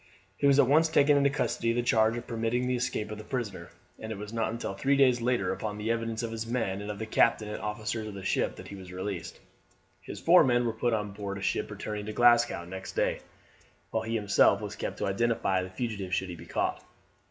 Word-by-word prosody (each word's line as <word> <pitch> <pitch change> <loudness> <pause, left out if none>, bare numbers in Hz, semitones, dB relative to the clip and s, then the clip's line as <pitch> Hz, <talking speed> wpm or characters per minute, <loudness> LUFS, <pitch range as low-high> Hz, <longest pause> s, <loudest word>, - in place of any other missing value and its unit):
He 140 - +2
was 140 -1 +5
at 140 - +6
once 155 +4 +5
taken 145 -1 +4
into 140 0 +4
custody 135 -4 -1
on - - -4
the 120 - +1
charge 110 -1 +3
of 120 - -6
permitting 115 +2 -1
the 125 0 +1
escape 120 -4 -2
of 105 - -6
his 110 - -10
prisoner, 105 -9 -4 0.3
and 110 - -6
it 110 - -4
was 105 +2 -8
not 115 -1 0
until 115 -3 -4
three 135 +8 +1
days 130 -3 +4
later, 125 +1 +1
upon 105 -1 -4
the 105 +2 -1
evidence 115 0 -2
of 115 - -3
his 115 0 -4
men 115 -5 -1
and 105 - -6
of 105 - -4
the 110 - -4
captain 110 0 +2
and 105 - -5
officers 110 +1 -3
of 105 - -7
the 95 -1 -8
ship, - - 0
that - - -10
he 100 - -7
was 95 -2 -10
released. 90 -2 -5 0.6
His - - -8
four 175 +1 +6
men 120 -3 +2
were 115 - 0
put 115 +1 0
on 105 -1 -3
board 100 0 -5
a - - -7
ship - - -1
returning 105 -1 -5
to 110 - -4
Glasgow 120 -6 +4
next 95 +2 -7
day, - - 0 0.7
while - - 0
he 115 +1 -3
himself 100 -2 +4
was 105 -1 -6
kept - - -4
to - - -2
identify 100 -2 +1
the 90 - -6
fugitive 100 -2 -3
should 95 - -2
he 90 - -5
be 85 +1 -12
caught. - - -1
110 Hz, 245 wpm, -29 LUFS, 100-120 Hz, 0.7 s, at